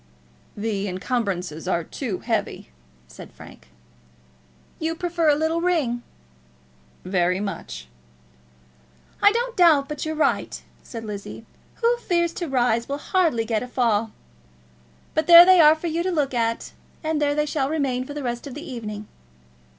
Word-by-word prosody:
"The 205 -1 -2
encumbrances 185 - -3
are 170 -2 0
too 205 - -5
heavy," - - -3 0.4
said 60 - -12
Frank. 60 - -15 1.1
"You 325 +1 -2
prefer 340 -2 0
a 290 - +5
little 320 +2 0
ring." 305 -10 0 1.0
"Very 180 0 +1
much." 200 - -6 1.3
"I 410 - +7
don't 475 +2 -2
doubt 315 -6 +5
but 300 -1 -5
you're 315 0 -3
right," 300 -3 0 0.2
said 230 -2 -8
Lizzie. 210 +1 -7 0.4
"Who 475 +1 +3
fears 345 -7 0
to 345 - -4
rise 240 -2 +1
will 280 - -2
hardly 310 - +1
get 220 -1 -1
a 250 - -5
fall. 230 -3 +1 1.0
But 315 -1 0
there 340 0 +11
they 370 -1 +6
are 305 0 +7
for 320 - -9
you 335 0 -1
to 370 +2 -1
look 290 -6 0
at, 230 -1 -1 0.3
and 310 -1 -1
there 290 0 +1
they 300 0 +1
shall 285 -2 -1
remain 275 -5 -1
for 290 +3 -9
the 295 - -5
rest 240 +1 -4
of 270 - -8
the 305 +4 -8
evening." 215 -5 -6
275 Hz, 155 wpm, -23 LUFS, 225-320 Hz, 1.3 s, there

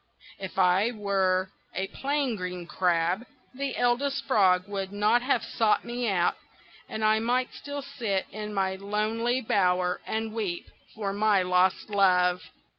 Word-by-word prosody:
If 190 -2 -7
I 190 +4 +4
were 195 -4 0 0.2
a 190 - -1
plain 280 -3 -1
green 180 -2 -5
crab 175 +4 +1 0.3
the 275 +1 -3
Eldest 245 +3 +1
Frog 190 -6 +3
would 195 -1 -4
not 210 +4 +2
have 260 +3 +1
sought 220 -2 +1
me 240 0 -2
out, 175 -3 +2 0.5
and 220 0 -2
I 215 0 +4
might 250 +3 0
still 285 -1 -6
sit 230 -9 -2
in 210 0 -6
my 190 -2 -1
lonely 220 +5 -1
bower 180 -6 +1
and 220 0 -2
weep 200 -6 -3 0.3
for 200 -2 -3
my 205 -2 +3
lost 180 +3 +1
love." 180 -3 +3
205 Hz, 145 wpm, -27 LUFS, 185-235 Hz, 0.5 s, I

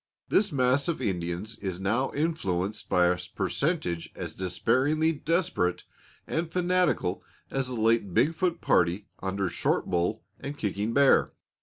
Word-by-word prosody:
This 200 -1 +3
mass 130 +1 +2
of 170 - -1
Indians 95 -1 -3
is 95 -3 -3
now 115 +8 0
influenced 105 - -1
by 90 -1 +4
a 90 0 +2 0.2
percentage 140 - -1
as - - -5
despairingly 130 - +1
desperate 160 - 0 0.4
and 165 0 -2
fanatical 180 - +1 0.3
as 135 -1 -1
the 125 - -4
late 115 -3 +2
Big 155 - +3
Foot 170 0 -1
party 90 +4 +2
under 95 0 -1
Short - - 0
Bull 90 +5 -1 0.2
and 140 +1 -6
Kicking 105 0 -2
Bear. 140 -1 +5
115 Hz, 140 wpm, -28 LUFS, 95-155 Hz, 0.4 s, Bear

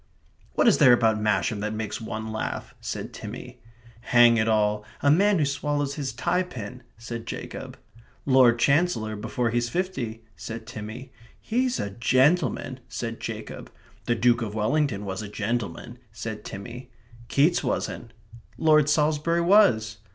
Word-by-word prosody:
"What - - +3
is 225 - +5
there 130 -5 +8
about 110 -2 +2
Masham 105 0 +1
that 105 +1 -3
makes 110 -1 -4
one 110 0 -5
laugh?" 110 - -4
said - - -5
Timmy. - - -8 0.4
"Hang 120 0 +5
it 110 0 +1
all 105 -1 +2 0.2
a 140 - +5
man 200 +5 +4
who 155 - +2
swallows 140 0 -1
his 140 -3 -3
tie 150 +9 0
pin," 125 - -7 0.2
said 115 0 -7
Jacob. - - -7 0.5
"Lord 130 -3 +5
Chancellor 140 -5 +1
before 115 +3 -2
he's 120 0 0
fifty," 125 -11 -3
said 115 0 -7
Timmy. 115 +3 -8 0.3
"He's 250 +2 0
a 100 - -3
gentleman," 130 - +1
said - - -5
Jacob. - - -7 0.3
"The 120 - +1
Duke 120 +1 +3
of 105 -2 -4
Wellington 110 -1 0
was 95 0 -4
a 105 - -6
gentleman," 115 +1 -4
said 110 -1 -6
Timmy. 120 +6 -8 0.4
"Keats 150 +8 +3
wasn't." - - -3 0.5
"Lord 155 -2 +4
Salisbury 155 +2 +2
was." 125 - +4
120 Hz, 145 wpm, -25 LUFS, 110-150 Hz, 0.5 s, there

